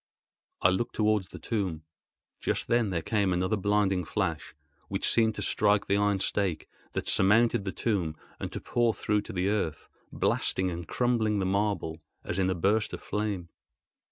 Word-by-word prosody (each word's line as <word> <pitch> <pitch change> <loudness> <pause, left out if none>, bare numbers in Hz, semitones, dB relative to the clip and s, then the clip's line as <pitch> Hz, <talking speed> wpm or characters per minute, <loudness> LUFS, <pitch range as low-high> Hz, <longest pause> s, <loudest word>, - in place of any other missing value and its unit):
I 90 - +7
looked 95 +6 -1
towards 105 -3 +2
the - - -10
tomb. 95 -8 -2 0.6
Just - - -1
then 120 -3 +2
there 85 -3 -2
came 100 0 +1
another 90 +4 +1
blinding 100 -2 +1
flash, 80 - -2 0.3
which - - -1
seemed 110 -2 +3
to 105 - -3
strike 100 +1 +2
the 100 - +1
iron 105 -1 +2
stake 95 -4 -1 0.3
that - - -3
surmounted 105 +1 +3
the 95 - -1
tomb 95 -10 -1 0.2
and - - -4
to - - -4
pour 120 -2 +1
through 105 -1 0
to - - -9
the 90 0 0
earth, 90 -8 -2 0.2
blasting 95 -1 +1
and 85 -1 -6
crumbling 115 -4 +1
the 95 - 0
marble, 100 -5 -1 0.2
as 85 - -3
in 95 -1 +2
a 95 - 0
burst 100 +5 +1
of - - -5
flame. 105 -5 -2
100 Hz, 175 wpm, -29 LUFS, 90-105 Hz, 0.6 s, I